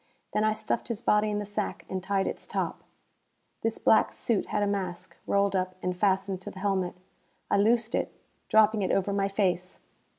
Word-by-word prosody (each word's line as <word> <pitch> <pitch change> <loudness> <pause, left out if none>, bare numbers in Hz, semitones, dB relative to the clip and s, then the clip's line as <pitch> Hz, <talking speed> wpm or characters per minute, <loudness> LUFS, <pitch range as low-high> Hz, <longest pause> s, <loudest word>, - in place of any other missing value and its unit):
Then 210 - +2
I 215 0 +3
stuffed - - -2
his 230 -4 -3
body 210 -3 +3
in 210 - -1
the 205 - -2
sack 205 0 -3
and 190 0 -3
tied 195 +1 0
its - - -4
top. - - -3 0.8
This 225 0 0
black 220 - +4
suit 230 -6 0
had 210 - 0
a - - +3
mask, 185 -3 -3
rolled 200 -1 +2
up 185 0 -1
and 180 0 -1
fastened 190 0 +1
to - - -6
the - - -12
helmet. 190 -2 0 0.6
I - - +4
loosed 225 +2 +3
it, - - 0 0.4
dropping 220 0 +5
it 190 - 0
over 195 +1 +1
my 200 0 +1
face. 185 -3 -1
200 Hz, 195 wpm, -28 LUFS, 190-210 Hz, 0.8 s, dropping